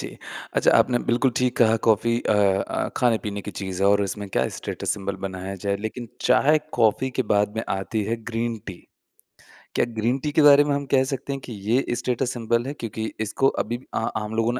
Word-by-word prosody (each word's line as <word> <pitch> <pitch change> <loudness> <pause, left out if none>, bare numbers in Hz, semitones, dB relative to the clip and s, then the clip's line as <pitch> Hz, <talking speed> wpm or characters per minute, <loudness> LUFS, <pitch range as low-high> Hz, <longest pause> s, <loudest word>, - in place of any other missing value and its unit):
जी। - - -7 0.4
अच्छा - - +4
आपने 120 -1 +3
बिल्कुल 125 +2 +3
ठीक 125 -1 +1
कहा 115 -1 +5
कॉफ़ी 115 +2 +3
अ - - +1
अ, 100 -1 +1
खाने-पीने 110 -4 0
की - - -6
चीज़ 95 0 -5
है 100 - +5
और 100 0 +4
उसमें 100 +1 -4
क्या - - +1
स्टेटस - - -4
सिंबल 100 -1 -4
बनाया 95 +1 -6
जाए 100 0 +1
लेकिन 115 +2 -5
चाय 140 +5 +4
कॉफ़ी 120 +3 +2
के - - +4
बाद 105 +1 +2
में 110 - -1
आती 95 +3 -2
है 115 +2 -1
ग्रीन 115 0 -2
टी। 95 - -5 1.0
क्या - - +3
ग्रीन 115 +4 +1
टी 150 - -1
के 155 +1 +3
बारे 145 0 +8
में 145 -1 0
हम 140 0 -3
कह 130 -1 +5
सकते 135 +1 -4
हैं 135 - -4
कि 120 - -7
ये 110 +5 0
स्टेटस 125 +1 -1
सिंबल 115 0 0
है? 140 - -3
क्योंकि 110 -4 -5 0.2
इसको 110 +5 +1 0.2
अभी 120 +3 -4 0.2
आ - - 0 0.2
आम 105 +1 -5
लोगों 115 +1 +1
ने 125 - -3
115 Hz, 215 wpm, -24 LUFS, 105-125 Hz, 1.0 s, बारे